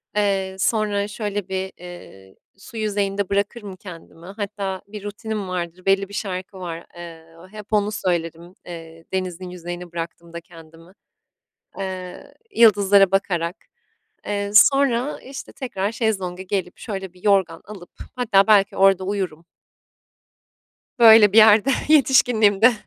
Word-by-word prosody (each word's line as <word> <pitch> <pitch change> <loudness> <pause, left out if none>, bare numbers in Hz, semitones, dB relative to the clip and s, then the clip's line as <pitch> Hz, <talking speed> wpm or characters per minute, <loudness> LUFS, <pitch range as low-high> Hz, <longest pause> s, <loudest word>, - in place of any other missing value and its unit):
Eee, 195 -2 0
sonra, 205 -1 0
şöyle, 205 -2 -4
bir, 190 0 -3
eee, 170 - -13 0.2
su 210 +3 -12
yüzeyinde 200 -2 -2
bırakırım 200 0 -3
kendimi. 170 -3 -13
Hatta 195 -1 -5
bir 205 0 -9
rutinim 210 0 -5
vardır, 180 0 -5
belli 195 0 +2
bir - - -13
şarkı 190 -1 -5
var. 170 -2 -7
Eee, 165 -2 -11 0.3
hep 210 0 -10
onu 210 0 +1
söylerim, 170 -3 -3
eee, 165 -1 -11
denizin 185 -1 -4
yüzeyine 175 0 -8
bıraktığımda 170 0 -7
kendimi. 165 +1 -17 0.9
Eee, 185 -2 -7 0.2
yıldızlara 200 -4 +5
bakarak. 180 -3 -1 0.7
Eee, 200 -1 -2
sonra, 275 +2 +4
işte, 270 +1 -10
tekrar 205 -6 -4
şezlonga 190 -6 -2
gelip, 190 -1 -4
şöyle, 195 -4 -6
bir 180 0 -21
yorgan 190 -5 +1
alıp 195 -4 -12 0.3
hatta 215 -6 +3
belki 205 -3 +4
orada 195 -1 +4
uyurum. 185 -5 -4 1.5
Böyle 220 -3 +8
bir 220 - +5
yerde. 220 +3 +6 0.2
Yetişkinliğimde. 245 -7 +4
195 Hz, 125 wpm, -21 LUFS, 180-210 Hz, 1.5 s, Böyle